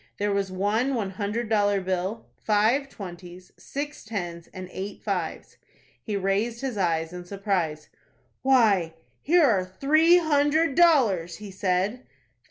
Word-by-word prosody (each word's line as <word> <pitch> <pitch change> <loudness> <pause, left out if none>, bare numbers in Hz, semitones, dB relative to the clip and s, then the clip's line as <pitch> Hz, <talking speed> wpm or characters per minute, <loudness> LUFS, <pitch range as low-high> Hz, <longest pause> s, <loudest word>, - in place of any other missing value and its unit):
There 205 0 0
was 200 -1 -1
one 215 +8 0
one 205 -5 -2
hundred 210 +4 -3
dollar 205 -2 +2
bill, 190 +3 -3 0.2
five 225 +7 +2
twenties, 180 -3 -10
six 290 +1 -6
tens, 175 -6 -5
and 185 -1 -8
eight 195 +2 -7
fives. - - -4 0.4
He 210 -3 -3
raised 200 +5 -1
his 265 -4 -3
eyes 165 -3 0
in 180 0 -7
surprise. 180 -5 -2 0.5
"Why, 210 -11 +3 0.3
here 340 +3 +4
are 210 -10 +3
three 310 - +4
hundred 310 -1 +2
dollars," 235 - +3
he 205 -2 -9
said. 190 +6 -1
205 Hz, 135 wpm, -25 LUFS, 185-255 Hz, 0.5 s, here